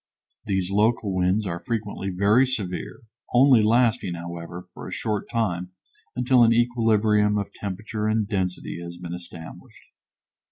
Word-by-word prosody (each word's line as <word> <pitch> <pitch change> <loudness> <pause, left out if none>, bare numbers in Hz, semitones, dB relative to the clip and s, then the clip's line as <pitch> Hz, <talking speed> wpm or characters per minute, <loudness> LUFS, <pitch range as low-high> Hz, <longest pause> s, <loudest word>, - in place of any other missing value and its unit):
These 95 -2 -1
local 105 0 +2
winds 95 +3 +1
are 85 -2 -3
frequently 105 -4 -3
very 100 +8 +3
severe, 100 -8 -4 0.3
only 130 -2 +6
lasting, 110 -5 +2
however, 85 +1 -7
for - - -9
a - - -8
short 105 -2 -3
time, 90 -6 -2 0.4
until 125 0 +4
an 115 - +5
equilibrium 110 -3 +3
of 100 - -3
temperature 105 +2 -4
and 110 -1 +1
density 95 -4 -3
has 85 0 -8
been 85 -1 -7
established. 85 -2 -11
105 Hz, 135 wpm, -24 LUFS, 90-115 Hz, 0.4 s, only